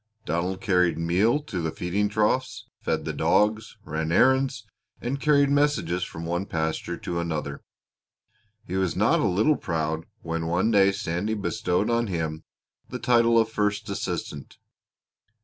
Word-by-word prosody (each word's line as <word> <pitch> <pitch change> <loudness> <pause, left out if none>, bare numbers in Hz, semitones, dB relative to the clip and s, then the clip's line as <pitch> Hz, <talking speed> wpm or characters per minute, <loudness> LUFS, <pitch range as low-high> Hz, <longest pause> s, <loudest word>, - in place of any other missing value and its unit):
Donald 90 +3 -2
carried 90 -3 +2
meal 90 - +2
to 95 - -4
the 80 - -1
feeding 95 +6 -1
troughs, 110 +3 0 0.2
fed - - -1
the - - -3
dogs, 105 +1 +1
ran 80 +1 -2
errands, 130 +3 +3 0.3
and 135 +3 -3
carried 145 -2 +4
messages 140 - +1
from 80 -1 -6
one 85 +3 -2
pasture 80 -1 -2
to 85 -1 -4
another. 75 -4 -3 1.0
He 95 - -3
was 95 -2 0
not - - +3
a - - +2
little 110 +12 +2
proud 80 -1 -2 0.2
when 80 0 -3
one 90 +7 +1
day 100 -2 +5
Sandy 100 +2 -2
bestowed 105 0 -1
on 115 0 +1
him 80 -4 -3 0.5
the - - -4
title 115 -1 +3
of 115 -1 +3
first 105 -1 -1
assistant. 75 -7 -5
95 Hz, 150 wpm, -25 LUFS, 85-115 Hz, 1.0 s, day